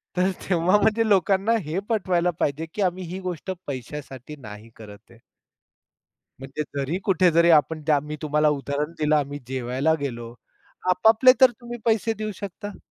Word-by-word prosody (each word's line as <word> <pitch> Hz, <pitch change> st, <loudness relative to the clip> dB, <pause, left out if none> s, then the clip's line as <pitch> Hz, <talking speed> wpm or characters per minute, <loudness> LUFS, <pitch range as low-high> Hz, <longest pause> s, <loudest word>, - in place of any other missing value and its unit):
तर 185 Hz, +1 st, +2 dB, 0.2 s
तेव्हा 180 Hz, +2 st, +3 dB
म्हणजे 220 Hz, +1 st, +2 dB
लोकांना 195 Hz, +2 st, +3 dB
हे 160 Hz, +5 st, -2 dB
पटवायला 180 Hz, -5 st, +1 dB
पाहिजे 145 Hz, +3 st, -1 dB
की, 210 Hz, -, -3 dB
आम्ही 185 Hz, -1 st, 0 dB
ही 180 Hz, +3 st, -6 dB
गोष्ट 185 Hz, 0 st, -5 dB, 0.2 s
पैशासाठी 135 Hz, +1 st, -7 dB
नाही 110 Hz, -4 st, -11 dB
करत 105 Hz, -2 st, -12 dB
आहे. 115 Hz, -, -18 dB, 1.2 s
म्हणजे 135 Hz, +3 st, -5 dB, 0.2 s
जरी 140 Hz, +6 st, -1 dB
कुठे 185 Hz, -2 st, +3 dB
जरी 170 Hz, +1 st, +4 dB
आपण 160 Hz, 0 st, +3 dB
त्या 150 Hz, -2 st, +4 dB
मी 150 Hz, +2 st, -7 dB
तुम्हाला 150 Hz, 0 st, +2 dB
उदाहरण 145 Hz, +3 st, -3 dB
दिलं 155 Hz, 0 st, +2 dB
आम्ही 145 Hz, -1 st, -1 dB
जेवायला 130 Hz, +4 st, 0 dB
गेलो, 120 Hz, -4 st, -5 dB, 0.6 s
आपापले 220 Hz, +7 st, +6 dB
तर 260 Hz, -1 st, +8 dB
तुम्ही 240 Hz, +1 st, -9 dB
पैसे 225 Hz, 0 st, +2 dB
देऊ 215 Hz, 0 st, -3 dB
शकता. 205 Hz, +2 st, -8 dB
160 Hz, 160 wpm, -24 LUFS, 140-195 Hz, 1.2 s, तर